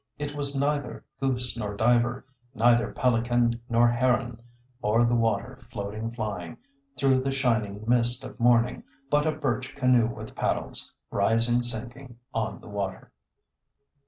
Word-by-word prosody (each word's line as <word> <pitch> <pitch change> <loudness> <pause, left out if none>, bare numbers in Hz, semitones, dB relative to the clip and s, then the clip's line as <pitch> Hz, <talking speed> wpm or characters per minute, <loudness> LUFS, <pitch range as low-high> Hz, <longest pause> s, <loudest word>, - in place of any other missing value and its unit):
It 145 0 -4
was 140 -1 +1
neither 145 -2 -2
goose 125 -3 0
nor 105 -3 -4
diver, 120 +2 +2 0.3
Neither 120 0 +3
pelican 120 -1 +1
nor 120 0 +4
heron 120 0 +1 0.4
O'er 115 +3 +3
the 120 - +1
water 115 +2 0
floating, 110 -1 -4
flying, 105 -7 -5 0.4
Through 135 -1 +3
the 135 +1 -1
shining 110 -6 0
mist 120 +1 +3
of 130 - -10
morning, 120 0 +3 0.3
But 150 +1 +3
a - - +3
birch 130 -4 -3
canoe 125 -4 +3
with 115 - -8
paddles, - - -1 0.2
Rising, 115 +2 +2
sinking 120 +2 -3 0.2
on 110 -1 -3
the - - -13
water." 100 -2 -5
120 Hz, 135 wpm, -27 LUFS, 115-130 Hz, 0.4 s, nor